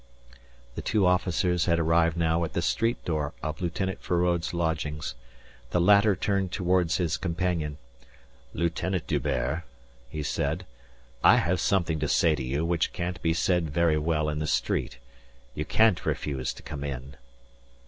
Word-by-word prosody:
The - - -5
two 105 -3 +1
officers 90 -1 +2
had 85 -1 +2
arrived 80 0 +2
now 85 0 +1
at 80 - -4
the 85 - 0
street 115 +7 0
door 75 -3 -1
of 80 +1 -4
Lieutenant 95 +2 -2
Feraud's 85 -1 0
lodgings. 80 -3 -2 0.6
The 75 - +1
latter 100 +3 +5
turned 95 0 0
toward 90 -3 +1
his 85 -4 +1
companion. 85 -4 -2 0.7
"Lieutenant 85 +2 -1
D'Hubert," 65 +7 -1 0.5
he 75 +2 -4
said, 80 +6 -2 0.6
"I - - +8
have 90 +2 +1
something 85 -5 +1
to 75 - -1
say 80 +3 +3
to 70 -3 -3
you 70 +5 -1
which 85 -1 0
can't 90 0 -4
be 80 0 +1
said 85 -1 +1
very 80 0 +2
well 75 0 0
in 75 0 -2
the 75 - -2
street. - - -1 0.6
You 75 - -3
can't 110 +2 +3
refuse 65 -4 -2
to - - -13
come 70 -1 -6
in." 70 0 -6
85 Hz, 155 wpm, -27 LUFS, 75-90 Hz, 0.7 s, I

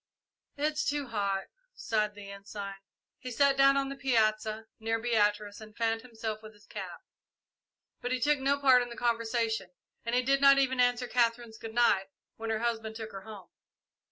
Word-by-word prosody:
"It's 300 +1 0
too 285 -3 -1
hot," 200 -3 -1 0.3
sighed 210 - -1
the 200 -1 -9
Ensign. 200 0 -7 0.5
He 255 - -6
sat 275 +3 +3
down 275 0 +5
on 275 0 0
the 275 - -5
piazza, 220 -4 +1
near 225 +1 0
Beatrice, 210 -3 0
and 215 -1 -13
fanned 225 -1 0
himself 220 -3 -5
with 215 0 -11
his 210 0 -21
cap; - - -7 1.0
but 245 - -3
he 255 - 0
took 290 +4 +2
no 275 +1 +2
part 260 -3 +6
in 245 - -4
the 235 - -9
conversation, 230 -4 0 0.3
and 245 +2 0
did 275 +1 +3
not 275 0 +8
even 260 -2 +2
answer 245 0 +3
Katherine's 235 -2 0
"good 225 0 -8
night" 200 -5 +3 0.3
when 225 0 -5
her 220 0 -1
husband 225 -2 -2
took 220 -1 -6
her 195 - -7
home. 205 -2 -11
230 Hz, 180 wpm, -30 LUFS, 215-255 Hz, 1.0 s, not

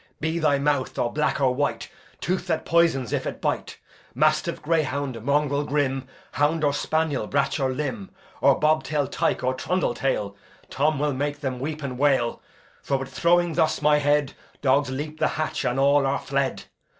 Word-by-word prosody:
Be 160 +2 -1
thy 155 -3 +3
mouth 140 -2 0
or 120 - -1
black 150 0 0
or 130 -2 +3
white, 145 +3 -1 0.3
Tooth 185 +1 -2
that 160 -2 -1
poisons 165 -8 +2
if - - -1
it - - -5
bite; - - -2 0.4
Mastiff, - - +1
greyhound, 140 -6 -1
mongrel 145 +1 +1
grim, 135 -2 -1 0.2
Hound 150 +3 +1
or 145 -1 +3
spaniel, 155 -6 -1
brach 140 +4 0
or 135 -1 +1
lym, 130 -7 -3 0.3
Bobtail 155 -1 +2
tyke 135 - -1
or 130 +1 +1
trundle 180 0 -1
tall 105 -6 -1 0.4
Tom 150 +2 +1
will 145 0 0
make 145 +2 -3
them 130 -3 -3
weep 150 +3 -4
and 130 -2 -5
wail; 135 -5 +2 0.4
For, 140 - 0
with 135 0 -7
throwing 175 0 +2
thus 160 -1 +1
my 150 0 +5
head, 145 -1 +1 0.3
Dogs 140 0 +3
leap 150 +4 -5
the - - +3
hatch, 155 -1 -2
and 125 +1 0
all 140 0 +4
are 140 +1 +1
fled. 140 -1 -2
145 Hz, 175 wpm, -24 LUFS, 135-155 Hz, 0.4 s, my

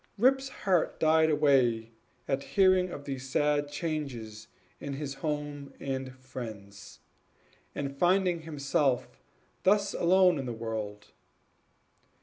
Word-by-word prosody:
Rip's 265 +4 +3
heart 185 -9 0
died 160 0 +4
away 130 -7 +3 0.4
at 135 0 0
hearing 185 +1 +3
of 145 -5 -8
these 135 -1 -5
sad 145 +1 +1
changes 140 -9 -4 0.3
in 140 - -5
his 140 0 -4
home 145 -1 -4
and 130 -1 -4
friends, 110 -6 -9 0.7
and 140 -1 -3
finding 180 +1 +2
himself 140 -4 -1 0.4
thus 200 +1 +3
alone 180 -2 +4
in 135 - -4
the 120 - -3
world. 110 -2 -5
145 Hz, 115 wpm, -29 LUFS, 130-170 Hz, 0.7 s, died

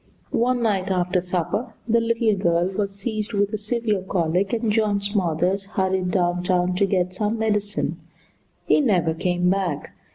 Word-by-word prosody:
One 245 +1 +1
night 195 -4 0
after 180 -1 +1
supper 185 +6 -2
the 230 0 +3
little 230 -1 +2
girl 175 -1 +1
was 195 0 -3
seized 215 +2 -4
with 205 +1 +1
a - - 0
severe 215 -2 -1
colic, 185 +1 0
and 230 -2 0
John 210 -2 +2
Smothers 195 -1 0
hurried 190 -2 -1
down 175 -1 +1
town 180 0 +1
to 200 0 +3
get 185 -2 0
some 210 +4 -1
medicine. 210 -2 -1 0.7
He - - +4
never 180 - +2
came 180 +2 0
back. 185 -5 -1
195 Hz, 160 wpm, -23 LUFS, 180-215 Hz, 0.7 s, He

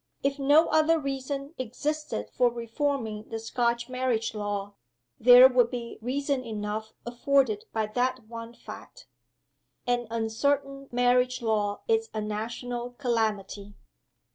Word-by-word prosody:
If 275 +1 0
no 290 +4 +5
other 315 +1 +4
reason 275 0 -4
existed 255 - -3
for 245 -1 +3
reforming 230 -2 -3
the 225 - -3
Scotch 235 +1 -1
marriage 255 -3 -1
law, 205 -1 -3 0.5
there 250 +2 +9
would 250 -2 +3
be 240 -2 -6
reason 275 +2 -1
enough 215 -1 -4
afforded 240 -2 +1
by 220 -1 0
that 245 +2 -1
one 230 +1 -9
fact. - - -12 0.8
An 245 -1 0
uncertain 275 +5 -1
marriage 250 +1 +2
law 210 -2 0
is 450 -1 +1
a - - -1
national 235 +3 -4
calamity." 215 -5 -2
245 Hz, 120 wpm, -27 LUFS, 220-275 Hz, 0.8 s, there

